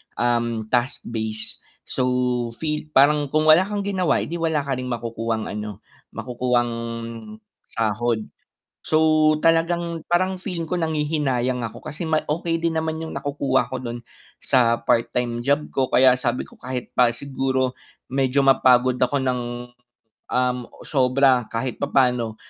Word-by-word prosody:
um, 120 -1 0
task-based. 115 -3 -2 0.2
So, 130 - -2 0.5
feel 150 -1 -3
parang 145 +2 +5
kung 155 +3 +1
wala 180 +5 +5
kang 205 -1 -2
ginawa, 190 -4 +1
'di 170 +2 -5
wala 160 -3 0
ka 135 -2 -2
ring 125 - -4
makukuhang 115 -2 -3
ano, 105 -1 -6 0.3
makukuhang 125 -1 0 1.0
sahod. 115 0 0 0.7
So, 155 -1 +4
talagang 165 0 +1
parang 185 +2 +1
feeling 180 -3 -4
ko 175 +2 -2
nanghihinayang 150 -6 0
ako 110 - -10
kasi 155 +4 -5
may 155 -1 +2
okey 165 +2 -1
din 165 -1 +1
naman 160 0 -2
yung 160 - -5
nakukuha 140 -1 0
ko 130 -1 -5
dun 120 -1 -5 0.4
sa 120 -2 +3
part 115 -1 +1
time 120 -1 -2
job 145 +2 +1
ko 130 -1 +1
kaya 130 0 +6
sabi 125 0 -2
ko - - -18
kahit 125 -1 -5
pa 125 -1 +5
siguro 130 0 -1 0.3
medyo 135 +1 +1
mapagod 130 -1 +5
ako 125 +3 +1
ng, 130 -1 0 0.9
um, 125 0 +1 0.3
sobra 130 -2 +3
kahit 115 +1 -3
papano, 125 -5 +1
130 Hz, 140 wpm, -23 LUFS, 120-155 Hz, 1.0 s, kaya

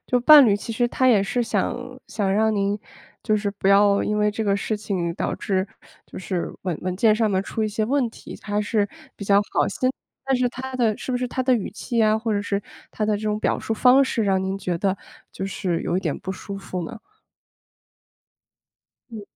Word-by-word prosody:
就 250 - +3
伴 290 +3 +9
侣 205 -4 +4
其 230 - -6
实 240 +2 +1
他 260 - +1
也 220 -6 +5
是 220 +5 -1
想 220 -5 0 0.4
想 200 -3 -1
让 220 +2 +2
您 200 0 0 0.5
就 215 - +2
是 205 -1 -1
不 195 -1 -1
要 200 0 +5
因 210 0 -1
为 210 0 +3
这 220 +1 -2
个 200 -1 +1
事 215 +1 -2
情 185 -5 -3
导 - - -2
致 190 -1 -1 0.4
就 - - -10
是 185 -1 -3
文 180 -4 -2
文 185 0 -3
件 215 +2 +4
上 220 -1 +1
面 190 -1 +1
出 220 - -3
一 215 - +1
些 215 +1 -1
问 255 0 +1
题， - - -11
他 205 0 -2
是 210 -1 0 0.3
比 200 - -8
较 200 0 +4
好 - - +2
心， 255 +6 -1 0.4
但 270 -1 +1
是 250 0 +1
他 260 +2 -7
的 230 -4 +1
是 260 - -4
不 - - +1
是 250 0 -2
他 260 - -3
的 255 -1 +4
语 220 - -2
气 235 -2 -4
呀， 215 0 +4
或 225 0 -2
者 205 -1 0
是 200 0 -1 0.3
他 215 - -2
的 215 - +1
这 205 - -8
种 210 -1 -1
表 - - 0
述 - - -3
方 250 +4 +5
式 230 -4 -1
让 190 -1 +1
您 190 +1 -2
觉 180 -3 -2
得， 195 +2 0 0.3
就 190 - -5
是 185 -3 -2
有 175 - -1
一 - - 0
点 160 -6 -2
不 190 - -5
舒 195 +1 -7
服 185 -2 -5
呢？ 225 - -8 2.1
嗯。 220 -2 -7
210 Hz, 245 characters per minute, -23 LUFS, 195-230 Hz, 2.1 s, 伴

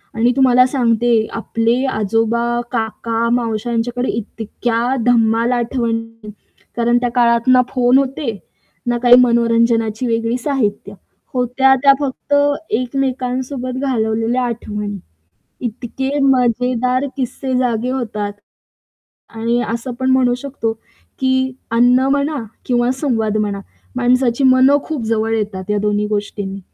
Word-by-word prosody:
आणि 235 +2 +3
तुम्हाला 255 -2 +5
सांगते 235 -3 +1
आपले 230 +2 0
आजोबा, 225 +2 0 0.3
काका, 230 0 -2
मावश्या, 235 -1 -1
यांच्याकडे 245 +2 -1
इतक्या 230 +3 -2
धम्माल 230 0 +3
आठवणी 230 -2 -2 0.5
कारण 240 0 +2
त्या 245 - 0
काळात 235 0 +3
ना 255 0 +6
फोन 250 0 +3
होते, 270 -4 -2 0.5
ना 240 - +1
काही 245 0 +8
मनोरंजनाची 230 -1 +2
वेगळी 230 +1 0
साहित्य. 215 -7 -2 0.4
होत्या 255 +2 +3
त्या 275 -1 +7
फक्त 285 +1 -4 0.4
एकमेकांसोबत 255 +1 -2
घालवलेल्या 230 -1 0
आठवणी. 210 -3 -4 0.7
इतके 265 +4 -3
मजेदार 250 0 +1
किस्से 260 0 -3
जागे 245 -1 0
होतात. 215 -5 -3 1.0
आणि 230 +2 0
असं 235 +2 -4
पण 260 0 0
म्हणू 255 -2 +3
शकतो 255 -4 -3 0.5
की 260 0 +1 0.2
अन्न 245 +2 +4
म्हणा 285 +2 0 0.3
किंवा 245 0 +1
संवाद 230 -6 -1
म्हणा, 205 -2 -1 0.4
माणसाची 250 +1 +1
मनं 260 +2 +5
खूप 305 -7 -4
जवळ 225 0 0
येतात 200 -3 -3
ह्या 210 - +1
दोन्ही 210 0 0
गोष्टींनी. 205 -2 -4
240 Hz, 115 wpm, -17 LUFS, 225-255 Hz, 1.0 s, काही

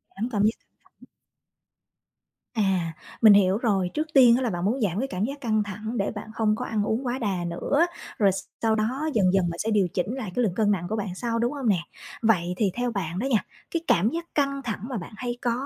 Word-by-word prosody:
Giảm 225 +5 -2
cảm 205 -2 0
giác 220 +2 +3
căng - - -40 0.3
thẳng. - - -17 1.5
À, 190 -6 +1 0.3
mình 215 -2 +9
hiểu 195 0 +4
rồi, 195 -6 +1
trước 310 +1 -1
tiên 245 -4 +7
á 260 - 0
là 245 - 0
bạn 175 -1 -2
muốn 245 +5 0
giảm 195 -1 0
cái 270 - -1
cảm 185 -2 -3
giác 280 +2 -6
căng 215 -3 +1
thẳng 215 +4 -5
để 200 - 0
bạn 220 0 -8
không 215 -1 +1
có 250 - -4
ăn 215 -2 -1
uống 230 +5 -1
quá 250 +2 -1
đà 190 -6 -1
nữa, 280 - +1 0.3
rồi 200 -3 +4 0.3
sau 220 -1 +2
đó 260 +9 -1
dần 190 -3 +3
dần 180 -3 +2
bạn 170 - -5
sẽ 225 - -1
điều 200 -4 +3
chỉnh 195 +7 -1
lại 215 -8 -5
cái 250 - +2
lượng 185 -5 0
cân 210 -2 +2
nặng 175 -3 -1
của 220 - -1
bạn 195 -4 -3
sau, 230 +1 -2
đúng 240 +1 +1
hông 270 -5 -3
nè? 190 -5 +3 0.4
Vậy 180 -6 +2
thì 200 -3 +2
theo 245 0 -1
bạn 180 -4 -3
đó 240 - -1
nha, 235 -7 +1 0.3
cái 335 - -1
cảm 200 +7 +4
giác 335 +3 -4
căng 275 -1 +1
thẳng 220 -6 -4
mà 250 - -3
bạn 175 - -7
hay 245 0 -3
có 240 - +1
215 Hz, 250 wpm, -25 LUFS, 195-245 Hz, 1.5 s, mình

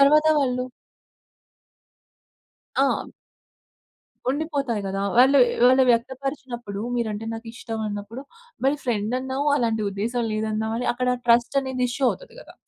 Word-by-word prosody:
తరువాత 300 +3 +6
వాళ్ళు. 250 -3 0 2.1
ఆ! - - +2 1.2
ఉండిపోతాయి 280 -6 -2
గదా! 195 +1 -2
వాళ్ళుయ్ 260 0 +6 0.2
వాళ్ళు 260 +1 +6
వ్యక్తపరిచినప్పుడు 245 -3 -2 0.2
మీరంటే 220 -2 -2
నాకిష్టం 225 0 -6
అన్నప్పుడు, 205 +5 -6 0.4
మరి 275 +2 +3
ఫ్రెండన్నావు, 255 +5 -1
అలాంటి 225 -4 0
ఉద్దేశం 230 +5 -2
లేదన్నావని 220 +2 -2
అక్కడ 250 +1 -1 0.2
ట్రస్టనేది 250 +2 +2
ఇష్యూ 265 +3 -2
అవుతది - - -9
గదా! - - -14
245 Hz, 100 wpm, -24 LUFS, 220-265 Hz, 2.1 s, తరువాత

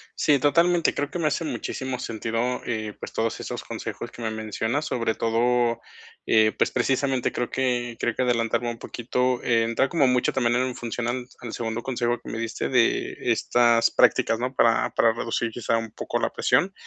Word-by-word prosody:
Sí, 145 -2 +3
totalmente, 170 +4 +3
creo 145 0 -2
que - - -5
me 160 - +1
hace 160 +2 -1
muchísimo 130 -4 -4
sentido, 115 +2 -2
eh, 110 -3 -3
pues, - - -8
todos 115 0 -1
esos - - -5
consejos 120 - -6
que - - -11
me 110 -1 -2
mencionas 110 +6 -2
sobre 115 -7 -1
todo, 120 +1 +1 0.5
eh, 110 -1 +4
pues - - +2
precisamente 130 +1 +1
creo 125 - -2
que 120 -2 -1
creo 120 - -1
que - - -1
adelantarme 120 -1 +1
un 115 -1 -6
poquito, 125 +1 -1
eh, 115 -2 +3
entra 115 +4 +1
como 150 -6 +3
mucho 125 -1 +2
también 120 -2 +1
en 125 0 0
función 120 0 -4
al 125 +1 -2 0.2
al 120 -2 -7
segundo 115 0 -3
consejo 120 -2 -1
que - - -9
me - - -4
diste 115 0 -3
de 125 -3 +2 0.2
estas 120 -1 +3
prácticas, 115 - +3
¿no? 125 +2 -2
Para 115 -3 +3
para 115 -1 +3
reducir 115 0 -2
quizá 115 0 0
un 115 -1 -4
poco - - -3
la - - -1
presión. 195 +2 +2
120 Hz, 190 wpm, -25 LUFS, 115-130 Hz, 0.5 s, eh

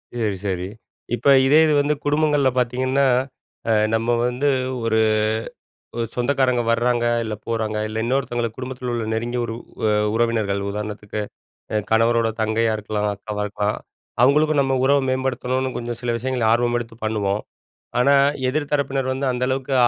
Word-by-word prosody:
சரி, 110 -4 -1
சரி. 90 -1 -2 0.5
இப்ப 120 +3 -3 0.2
இதே 145 +3 +5
இது 155 - +2
வந்து 145 +1 +1
குடும்பங்கள்ல 145 -2 +2
பார்த்தீங்கன்னா, 130 +2 +1 0.6
அ - - +4 0.2
நம்ம 115 +1 -1 0.2
வந்து 125 +4 -1 0.4
ஒரு 110 -1 +2 1.0
ஒரு 115 - -1
சொந்தக்காரங்க 125 -1 +1
வராங்க, 120 +1 +1 0.2
இல்ல 110 -1 -3
போறாங்க. 110 -2 -2
இல்ல 110 +1 -4
இன்னொருத்தங்களுக்கு 120 -3 -1
குடும்பத்துல 125 -1 -5
உள்ள 115 -1 -2
நெருங்கிய 120 +2 -2
ஒரு 115 - -4 0.3
அ - - +3 0.2
உறவினர்கள் 110 -4 +1
உதாரணத்துக்கு, 105 0 -5 0.5
அ - - +2
கணவரோட 115 0 +3
தங்கையா 110 +1 +1
இருக்கலாம், 105 0 -2
அக்காவா 105 +1 -4
இருக்கலாம், 105 +1 -2 0.5
அவங்களுக்கும் 150 +2 +4
நம்ம 135 -1 +1
உறவ 140 +1 +4
மேம்படுத்தணும்னு 130 0 -1
கொஞ்சம் 120 0 -5
சில 120 -1 -1
விஷயங்கள 125 -1 -1
ஆர்வம் 120 0 +1
எடுத்து 115 -1 -9
பண்ணுவோம். 105 -2 -1 0.6
ஆனா, 140 +3 +5 0.4
எதிர் 145 +1 -2
தரப்பினர் 135 -2 0
வந்து 135 +1 -2
அந்த 125 0 -4
அளவுக்கு 135 0 -1
120 Hz, 145 wpm, -22 LUFS, 110-130 Hz, 1.0 s, இதே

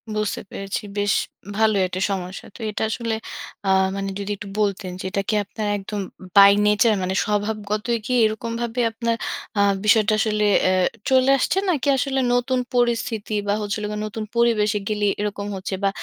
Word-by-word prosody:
বুঝতে 215 -1 -1
পেরেছি। 195 +2 -4 0.2
বেশ 205 0 +2 0.4
ভালোই 215 -3 +3
একটা 185 +1 -4
সমস্যা। 185 -1 -5
তো - - -12
এটা 210 - -3
আসলে 230 0 -2 0.5
আ - - +2 0.3
মানে 195 0 -3
যদি 200 +1 -4
একটু 205 - -8
বলতেন 200 -3 -1
যে, - - -6
এটা 200 - 0
কি 215 - +2
আপনার 210 +1 -5
একদম 205 +1 -5 0.2
উম 185 - -10
by 200 0 +10
nature, 210 +1 +4
মানে 185 +1 -1
স্বভাবগতই 210 +2 -1
কি 255 - -4
এরকমভাবে 230 +2 -2
আপনার 230 +1 -1 0.4
আ - - +4 0.2
বিষয়টা 215 0 +4
আসলে 215 -1 +1 0.2
অ্যা 185 - +3 0.4
চলে 260 0 +4
আসছে? 275 - 0
নাকি 300 -5 0
আসলে 270 0 0
নতুন 250 +1 +1 0.2
পরিস্থিতি 230 -3 0
বা, 200 - +2
হচ্ছে 205 +1 -2
হল 210 - -3
গে - - -4
নতুন 220 +1 -5
পরিবেশে 220 -3 +3
গেলেই 210 -1 +1
এরকম 205 -1 -3
হচ্ছে? 190 +1 -5
বা, 195 - +4
210 Hz, 175 wpm, -22 LUFS, 200-230 Hz, 0.5 s, by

